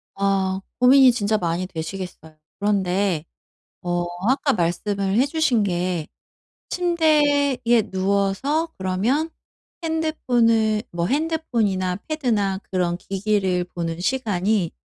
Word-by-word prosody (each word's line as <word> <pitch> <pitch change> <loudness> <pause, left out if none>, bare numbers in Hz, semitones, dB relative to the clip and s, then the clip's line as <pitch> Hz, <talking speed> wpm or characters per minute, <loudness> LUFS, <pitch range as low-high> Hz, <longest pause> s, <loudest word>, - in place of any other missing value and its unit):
아 195 -1 0 0.2
고민이 260 +1 +7
진짜 215 -2 0
많이 175 0 -1
되시겠어요. 160 -2 -7 0.2
그런데 190 -4 0 0.6
어 175 0 -1 0.2
아까 275 +1 +2
말씀을 195 +4 -1
해 255 - +4
주신 285 -7 +1
게 175 -3 -1 0.6
침대에 300 -6 +2 0.3
누워서 200 - 0
그러면 215 - 0 0.5
핸드폰을 240 -9 +1
뭐 170 0 -1
핸드폰이나 235 - 0
패드나 220 -11 0
그런 175 -2 0
기기를 190 -2 0
보는 170 -1 -5
시간이 205 -4 0
200 Hz, 235 characters per minute, -22 LUFS, 185-265 Hz, 0.6 s, 고민이